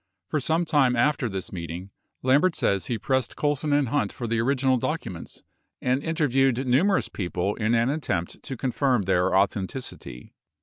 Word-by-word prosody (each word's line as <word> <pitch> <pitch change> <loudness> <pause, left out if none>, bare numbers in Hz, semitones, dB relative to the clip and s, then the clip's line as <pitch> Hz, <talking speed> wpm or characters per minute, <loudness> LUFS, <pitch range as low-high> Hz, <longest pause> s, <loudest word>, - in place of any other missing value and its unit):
For 155 - 0
some 160 +5 0
time 135 -6 +3
after 125 0 +1
this 95 -2 -5
meeting, 85 +2 -6 0.3
Lambert 145 +7 +3
says 100 -1 0
he 120 - -1
pressed 130 +4 -1
Colson 145 0 0
and 145 -3 +2
Hunt 145 +3 0
for 120 - -6
the 115 0 0
orig 135 +4 +1
inal 130 -2 +3
documents 115 - -5 0.4
and 130 +2 0
interviewed 135 -5 +1
numerous 180 +11 +3
people 90 +1 -2
in 110 +1 0
an 115 +3 +2
attempt 140 - -3
to 135 -3 -6
confirm 130 -2 +1
their 90 -1 +2
authenticity. 95 - -2
125 Hz, 165 wpm, -25 LUFS, 100-145 Hz, 0.4 s, time